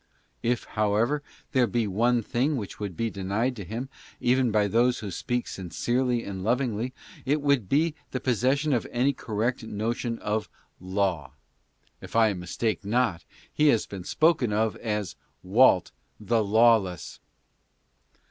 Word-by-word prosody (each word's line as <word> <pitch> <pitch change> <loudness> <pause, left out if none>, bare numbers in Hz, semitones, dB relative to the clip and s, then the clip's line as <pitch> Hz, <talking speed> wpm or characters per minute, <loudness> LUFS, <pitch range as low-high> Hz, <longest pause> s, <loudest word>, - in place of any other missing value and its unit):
If. 120 0 0
however, 110 +7 0 0.3
there 130 -3 +3
be 120 -1 0
one 115 +4 +1
thing 135 +7 0
which 105 -5 -6
would 100 -5 -5
be 115 -1 -1
denied 100 +7 -1
to 100 - -5
him, 115 +8 -5 0.3
even 125 0 +2
by 105 -1 +2
those 120 +4 +2
who 100 -3 -6
speak 120 +7 -2
sincerely 120 +7 -1
and 95 -2 -6
lovingly, 120 +1 0 0.3
it 145 +4 +1
would 140 -8 +1
be 155 +3 +2 0.2
the 130 - -3
possession 130 +5 +1
of 120 - 0
any 130 +4 +1
correct 120 +2 -2
notion 115 +2 -2
of 105 0 -2 0.3
Laze. 95 -6 -1 0.7
If - - -10
I 110 -2 +4
mistake 100 +5 -2
not, 105 -5 0 0.3
he 150 - +3
has 115 -7 +3
been 95 -3 -8
spoken 155 - +2
of 110 +1 +1
as 105 -5 -3 0.2
" - - -45
Walt, 120 -6 +5 0.3
the 110 +1 +1
lawless." 110 -3 +2
115 Hz, 145 wpm, -27 LUFS, 105-125 Hz, 0.7 s, Walt